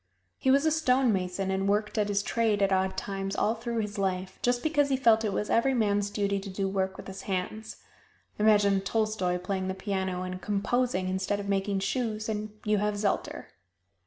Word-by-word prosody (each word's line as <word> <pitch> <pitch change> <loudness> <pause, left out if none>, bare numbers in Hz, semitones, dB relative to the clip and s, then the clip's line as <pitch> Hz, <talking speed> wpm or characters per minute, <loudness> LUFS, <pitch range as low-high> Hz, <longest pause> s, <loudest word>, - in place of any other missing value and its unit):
He 265 - +1
was 280 +3 +4
a 315 - +3
stone 260 -6 +3
mason, 190 0 -2
and 195 +1 0
worked 210 +1 0
at 210 -2 +1
his 205 0 0
trade 220 -3 +1
at 195 0 +3
odd 190 0 0
times 195 0 -3
all 220 - +2
through 235 +1 -4
his 210 0 -5
life, 190 -1 -2
just 245 0 +1
because 290 -2 +2
he 265 - +2
felt 225 -3 +4
it 210 - 0
was 210 - -1
every 265 +3 +3
man's 205 -3 +1
duty 200 -1 0
to 195 0 -3
work 190 0 -1
with - - -9
his 195 0 -8
hands. 195 +4 -3 0.6
Imagine 205 -2 +4
Tolstoy 205 -3 0
playing 185 +1 -3
the 190 - -2
piano 190 -2 -2
and 185 0 -5
composing 210 -1 0
instead 190 +2 -1
of 200 - -5
making 195 0 0
shoes, 215 +1 -2
and 215 -1 -3 0.2
you 210 -1 +2
have 210 0 0
Zelter. 205 0 -2
205 Hz, 195 wpm, -28 LUFS, 190-220 Hz, 0.6 s, was